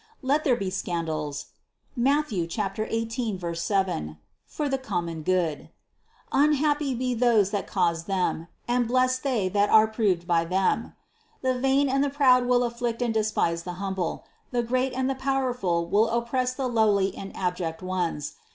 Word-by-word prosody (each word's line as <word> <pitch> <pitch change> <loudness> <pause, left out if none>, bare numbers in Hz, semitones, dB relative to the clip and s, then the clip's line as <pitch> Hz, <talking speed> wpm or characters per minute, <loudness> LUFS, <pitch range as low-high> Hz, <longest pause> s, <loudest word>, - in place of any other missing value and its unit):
Let 285 +4 +2
there 260 -5 +3
be 195 -4 -3
scandals 160 -5 -3 0.4
(Matth. 275 +2 +1
18, 210 +1 -2
7) 170 - -1 0.3
for 300 - -3
the 270 -1 -1
common 170 - -3
good; 170 -3 -1 0.6
unhappy 295 -1 +2
be 250 +1 -1
those 225 -5 +3
that 205 -2 -2
cause 170 -3 0
them, 180 -3 -1 0.2
and 245 -1 +1
blessed 255 +1 +2
they 245 -9 0
that 205 +2 +2
are 220 0 +7
proved 210 -6 0
by 170 -1 +2
them. 185 +3 0 0.5
The 260 0 +2
vain 270 +2 +3
and 275 +1 +2
the 285 - +1
proud 255 -3 +4
will 245 0 +3
afflict 235 0 -2
and 235 -2 0
despise 210 -6 0
the 180 +1 -6
hum 190 +2 -4
ble; 180 -3 -3 0.2
the 240 -1 0
great 255 +2 0
and 260 0 0
the 270 - +1
powerful 255 -10 0
will 215 +4 +3
oppress 250 +2 -1
the 265 -1 -1
lowly 205 -5 +2
and 195 - -7
abject 180 -2 -2
ones. 180 -5 -2
220 Hz, 160 wpm, -26 LUFS, 180-255 Hz, 0.6 s, are